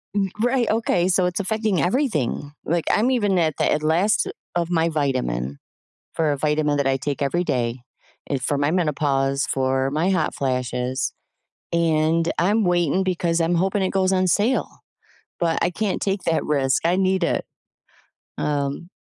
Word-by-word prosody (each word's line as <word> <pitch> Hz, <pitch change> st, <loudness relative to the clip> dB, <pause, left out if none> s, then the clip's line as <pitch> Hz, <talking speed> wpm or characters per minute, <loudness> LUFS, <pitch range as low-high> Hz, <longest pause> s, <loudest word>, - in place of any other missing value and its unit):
M 195 Hz, -2 st, +1 dB
right, 245 Hz, -1 st, +2 dB
okay, 215 Hz, -5 st, +1 dB
so 185 Hz, 0 st, +3 dB
it's 180 Hz, +3 st, -1 dB
affecting 215 Hz, -4 st, 0 dB
everything, 165 Hz, -, -1 dB
like, 170 Hz, +1 st, -1 dB
I'm 240 Hz, +5 st, +2 dB
even 205 Hz, -6 st, +1 dB
at 160 Hz, -3 st, +1 dB
the -, -, +1 dB
at 150 Hz, -, 0 dB
last 175 Hz, +7 st, +2 dB, 0.3 s
of 170 Hz, -1 st, 0 dB
my 165 Hz, -1 st, +2 dB
vitamin 100 Hz, -, -2 dB, 0.6 s
for 160 Hz, -2 st, +1 dB
a -, -, -1 dB
vitamin 150 Hz, 0 st, +1 dB
that 140 Hz, -1 st, 0 dB
I 135 Hz, 0 st, +2 dB
take 140 Hz, +1 st, -3 dB
every 170 Hz, +6 st, +1 dB
day, 120 Hz, -4 st, -1 dB, 0.5 s
eh, 140 Hz, -, 0 dB
for 140 Hz, +3 st, -1 dB
my 145 Hz, +1 st, +1 dB
menopause, 145 Hz, -5 st, 0 dB
for 130 Hz, 0 st, 0 dB
my 155 Hz, +5 st, 0 dB
hot 170 Hz, -5 st, 0 dB
flashes, 125 Hz, -1 st, -1 dB, 0.6 s
and 165 Hz, 0 st, +2 dB
I'm 210 Hz, +6 st, +2 dB
waiting 175 Hz, 0 st, +2 dB
because 175 Hz, -2 st, 0 dB
I'm 165 Hz, +2 st, +1 dB
hoping 190 Hz, +3 st, +1 dB
it 190 Hz, -, 0 dB
goes 190 Hz, -1 st, +1 dB
on 185 Hz, 0 st, +2 dB
sale, 215 Hz, +9 st, 0 dB, 0.6 s
but 165 Hz, -1 st, +1 dB
I 175 Hz, -, +2 dB
can't 200 Hz, +2 st, -2 dB
take 195 Hz, 0 st, -1 dB
that 165 Hz, -1 st, +1 dB
risk, 135 Hz, -1 st, +1 dB
I 175 Hz, +2 st, +2 dB
need 190 Hz, -1 st, +1 dB
it. -, -, 0 dB, 0.9 s
Um 145 Hz, +3 st, -2 dB
165 Hz, 165 wpm, -22 LUFS, 140-185 Hz, 0.9 s, so